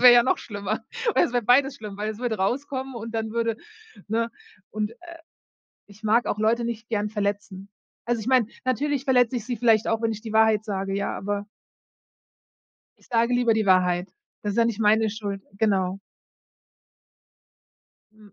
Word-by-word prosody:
Das - - -5
wäre 245 -1 +10
ja 240 - +7
noch - - +2
schlimmer. 205 +1 -4 0.3
Oder - - +4
es 240 - -3
wäre 245 -1 +1
beides 270 +4 +4
schlimm, 210 -4 -8
weil 210 +1 -2
es 215 - -8
würde 240 -3 -1
rauskommen 265 +5 -2
und 225 0 -6
dann 220 -1 -2
würde 230 -1 0 0.5
ne? 230 +2 0 0.4
Und, 215 +1 -2
äh, 340 +7 -13 0.7
ich 205 +1 -18
mag 225 +3 +3
auch 210 - -1
Leute 230 +2 +2
nicht 230 -1 -5
gern 210 -2 -1
verletzen. 200 -2 -3 0.4
Also, 240 -2 0
ich 215 - -7
meine, 255 -4 +4 0.2
natürlich 275 +2 0
verletze 250 -2 +3
ich 230 - -4
sie 245 -2 -2
vielleicht 225 -1 +3
auch, 225 0 0
wenn 225 0 +1
ich 215 - -7
die 220 -2 -6
Wahrheit 220 -1 +4
sage, 195 -2 -3
ja, 200 0 -2
aber 205 +1 -3 1.5
ich - - -24
sage 235 0 +1
lieber 245 -2 +3
die 220 -2 0
Wahrheit. 180 -1 +3 0.3
Das 205 -1 -1
ist - - -6
ja 230 - +5
nicht 230 -2 -1
meine 220 0 +4
Schuld. 200 -2 -5 0.2
Genau. 195 -3 +1 2.1
Mhm. 210 -2 -19
220 Hz, 185 wpm, -25 LUFS, 205-240 Hz, 2.1 s, wäre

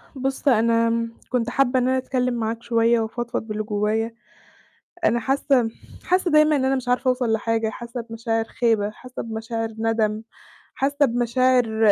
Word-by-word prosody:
بُصّ 270 +2 -3
أنا 230 -2 +4
م 230 0 -2
كنت 240 -2 0
حابّة 260 0 +2
إن 250 - +1
أنا 260 0 +2
أتكلّم 255 -1 -1
معاك 230 0 -3
شوية 230 0 +3
وأفضفض 235 +2 -3
باللي 215 0 -3
جوّايا، 215 +2 -1 0.9
أنا 235 +2 +3
حاسّة 265 0 +1 0.4
حاسّة 365 -1 +1
دايمًا 305 0 +5
إن 265 -2 +1
أنا 265 +1 +2
مش 260 -2 -4
عارفة 250 +1 +2
أوصل 250 -3 +1
لحاجة، 225 0 0
حاسّة 235 +2 -6
بمشاعر 225 0 -2
خيبة، 225 -3 +1
حاسّة 250 +3 -9
بمشاعر 225 0 -4
نَدم، 220 -1 0 0.5
حاسّة 285 +2 +2
بمشاعر 240 -2 +2
235 Hz, 155 wpm, -23 LUFS, 225-255 Hz, 0.9 s, دايمًا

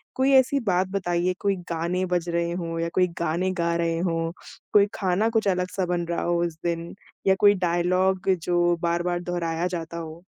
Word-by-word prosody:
कोई 265 +1 +2
ऐसी 265 +1 +4
बात 185 0 +2
बताइए 180 -2 0
कोई 200 -1 +1 0.2
गाने 170 +3 -1
बज 175 -1 0
रहे 170 0 0
हों 165 -1 -3
या 165 0 -1
कोई 180 -1 +3
गाने 170 +3 0
गा 170 0 +1
रहे 165 -1 0
हों, 165 -2 -1 0.4
कोई 205 -1 +7
खाना 195 +3 +1
कुछ 225 -2 0
अलग-सा 185 0 0
बन 175 -1 -1
रहा 170 0 -2
हो 175 0 0
उस 170 -2 -3
दिन, 170 0 -3 0.3
या 190 - +5
कोई 205 +1 +7
डायलॉग 185 +2 +1
जो 175 0 +2
बार-बार 175 +1 0
दोहराया 175 -1 -2
जाता 165 0 -6
हो? 165 0 -8
175 Hz, 185 wpm, -25 LUFS, 170-185 Hz, 0.4 s, कोई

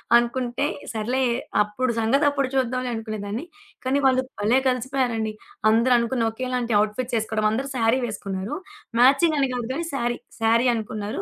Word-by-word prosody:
అనుకుంటే, 240 +2 +1 0.3
సర్లే 235 +4 -1 0.4
అప్పుడు 235 +4 0
సంగతప్పుడు 275 +4 +2
చూద్దాంలే 255 -1 0
అనుకునేదాన్ని. 215 +3 -4 0.4
కానీ, 265 +2 +1
వాళ్ళు 260 -1 +4 0.2
భలే 220 +5 +3
కలిసిపోయారండి. 250 -3 0 0.4
అందరూ 235 +3 +4
అనుకుని 235 0 0
ఓకేలాంటి 250 0 -2
అవుట్‌ఫిట్సేసుకోవడం. 220 0 -1
అందరూ 265 +5 -2
శారీ 230 +1 +3
వేసుకున్నారు. 195 -2 -4 0.4
మ్యాచింగని 280 +2 +5
గాదు 240 -2 -3
గానీ, 335 +4 -3
శారీ, 240 -2 -1 0.2
శారీ 230 +3 +4
అనుకున్నారు. 215 - -4
240 Hz, 125 wpm, -24 LUFS, 220-260 Hz, 0.4 s, మ్యాచింగని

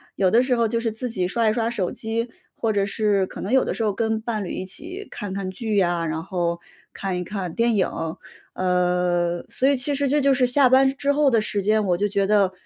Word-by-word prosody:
有 185 -2 +2
的 235 - +5
时 255 -1 +1
候 230 -1 +2
就 230 +1 -1
是 230 -1 -1
自 225 +2 -5
己 185 -4 0
刷 230 +3 0
一 215 - +3
刷 230 0 0
手 200 -7 -2
机 230 0 -3 0.3
或 220 -1 -1
者 200 0 +1
是 200 -2 +1
可 - - -10
能 210 +7 -3
有 265 - +5
的 - - -3
时 225 - -2
候 210 -2 +1
跟 220 +1 -1
伴 220 -2 -3
侣 180 - -6
一 185 - -4
起 355 - -7
看 205 -2 -6
看 190 -1 -4
剧 220 +2 -3
呀， 175 -3 +2
然 160 +1 -3
后 175 -3 -2 0.3
看 190 -2 -3
一 180 - -3
看 185 -3 -5
电 235 0 +2
影。 190 -3 +2 0.7
呃， 180 -1 +1
所 265 - +1
以 280 - +3
其 275 +3 -1
实 280 -1 0
这 295 - +3
就 275 -1 +4
是 250 -1 +2
下 260 +1 +5
班 265 +1 +5
之 285 0 +1
后 290 -1 +3
的 230 -3 +3
时 210 -1 -1
间。 215 +1 +2
我 180 -2 +1
就 205 +2 0
觉 200 -1 0
得， 200 -3 +3
215 Hz, 270 characters per minute, -23 LUFS, 185-240 Hz, 0.7 s, 的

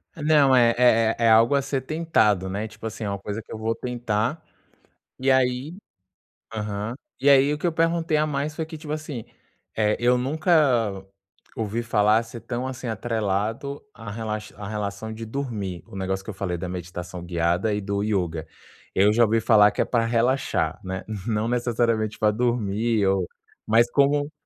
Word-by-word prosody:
Não, 150 -3 +4
é 120 -2 +5
é 115 -2 +4
é 115 -1 +4
algo 115 +5 +5
a 140 - +3
ser 135 0 -2
tentado, 130 - +1
né, 105 +3 -3
tipo 110 +1 -12
assim, 110 0 -4
é 100 - -2
uma 100 - -2
coisa 105 +3 -5
que - - -17
eu - - -5
vou 110 +1 -1
tentar. 120 +5 -2 0.8
E 130 +1 +1
aí 130 +5 +1 0.8
Aham. 105 +2 -3 0.2
E 140 +2 +4
aí 140 +1 +6
o - - -2
que 155 - -5
eu 170 - +2
perguntei 165 -1 +1
a 150 - +2
mais 150 +1 -2
foi 160 -1 -3
que 160 0 -9
tipo 150 0 -5
assim, 150 -7 -5 0.5
eh, 105 -1 +2
eu 120 +1 +4
nunca 130 - +2 0.5
ouvi 110 +1 -2
falar 110 -2 +3
a 115 - +1
ser 115 0 -10
tão 120 +3 -4
assim 130 -1 -6
atrelado 110 +4 -2
a 115 -3 -8
relax 110 0 -5
a 100 - -7
relação 105 +1 -4
de 110 +1 -6
dormir. 110 - -4
O - - -12
negócio 95 0 -2
que 110 - -10
eu - - -4
falei 95 -2 -3
da 90 +1 -5
meditação 90 0 -6
guiada 85 +4 0
e 105 - -1
do 100 0 -2
Yoga. 90 -7 -1 0.5
Eu 100 +2 +4
já 115 +2 +4
ouvi 115 +1 +2
falar 105 -2 +6
que 105 - -1
é - - +2
para 115 -2 +1
relaxar, 120 +4 0
né, 95 0 -4 0.2
não 110 -1 0
necessariamente 115 -3 0
para 105 -1 +3
dormir 115 -2 0
ou 95 -2 +1 0.4
mas 115 +2 +4
como 145 +2 +2
115 Hz, 185 wpm, -24 LUFS, 105-130 Hz, 0.8 s, aí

